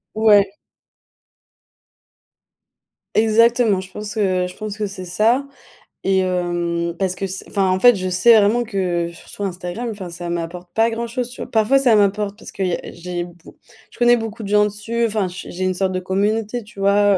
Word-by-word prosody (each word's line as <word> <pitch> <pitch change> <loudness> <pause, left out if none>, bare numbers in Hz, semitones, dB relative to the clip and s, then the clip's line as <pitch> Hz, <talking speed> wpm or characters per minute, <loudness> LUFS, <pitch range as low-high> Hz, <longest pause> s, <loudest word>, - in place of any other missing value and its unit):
Ouais. 205 -3 +4 2.6
Exactement, 225 -1 +4
je 190 0 -9
pense 210 +2 -6
que, 185 -4 +1
heu, - - -3
je 180 - -11
pense 215 -1 -5
que 210 -1 -1
c'est 190 -1 -8
ça 220 +9 +2 0.6
et 190 0 +2
hem 175 -2 -1
parce 185 -1 0
que 195 - -3
s 190 0 -5
enfin, 195 -2 0
en 185 - +1
fait, 245 +3 +7
je 185 -1 -3
sais 220 +6 +6
vraiment 215 +4 +3
que, 185 -6 -1
heu, 170 - -9
surtout 200 +4 -9
Instagram, 180 +5 -4
enfin 200 -5 -6
ça 175 0 -6
m'apporte 175 +1 -5
pas 225 +1 +3
grand-chose, 235 +2 -3
tu - - -9
vois? - - -6
Parfois, 225 +5 +3
ça 250 -5 +4
m'apporte 205 0 +1
parce - - -11
que - - -8
il 185 - +1
y - - -1
a - - -4 0.2
j'ai 175 0 -4
b 175 0 -11 0.6
je - - -19
connais 240 0 +5
beaucoup 225 -1 -5
de - - -5
gens 210 0 +4
dessus. 215 +3 -2
Enfin 210 -3 -1
j 180 0 -8
j'ai 185 +2 -4
une 185 0 +1
sorte 190 +1 0
de 185 - -1
communauté, 210 +5 -1
tu 210 -1 -15
vois? 200 0 +4
200 Hz, 205 wpm, -20 LUFS, 185-220 Hz, 2.6 s, fait